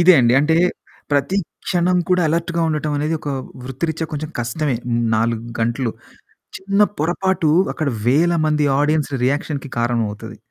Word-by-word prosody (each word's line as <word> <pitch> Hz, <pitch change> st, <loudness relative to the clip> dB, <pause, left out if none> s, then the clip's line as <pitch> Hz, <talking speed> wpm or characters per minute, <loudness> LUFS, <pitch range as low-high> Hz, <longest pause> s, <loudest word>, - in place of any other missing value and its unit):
ఇదే 175 Hz, +1 st, +7 dB
అండి. 120 Hz, 0 st, +4 dB
అంటే, 160 Hz, +2 st, +2 dB, 0.6 s
ప్రతి 145 Hz, +7 st, +1 dB, 0.3 s
క్షణం 180 Hz, 0 st, +2 dB
కూడా 180 Hz, -1 st, +3 dB
అలర్ట్‌గా 170 Hz, +1 st, 0 dB
ఉండటవనేది 150 Hz, 0 st, -1 dB
ఒకా 145 Hz, -2 st, -3 dB, 0.3 s
వృత్తిరిత్యా 160 Hz, +5 st, -3 dB
కొంచెం 150 Hz, +1 st, -4 dB
కష్టమే. 120 Hz, +3 st, -1 dB, 0.4 s
4 115 Hz, +1 st, 0 dB
గంటలు, 115 Hz, +1 st, 0 dB, 0.7 s
చిన్న 200 Hz, +2 st, 0 dB, 0.2 s
పొరపాటు 175 Hz, 0 st, +1 dB, 0.2 s
అక్కడ 155 Hz, -, -2 dB, 0.2 s
వేల 165 Hz, +7 st, +4 dB
మంది 150 Hz, -1 st, +2 dB
ఆడియన్స్ 150 Hz, 0 st, +1 dB
రియాక్షన్‌కి 140 Hz, +1 st, -1 dB
కారణమవుతది, 115 Hz, -3 st, -2 dB
150 Hz, 125 wpm, -20 LUFS, 130-170 Hz, 0.7 s, ఇదే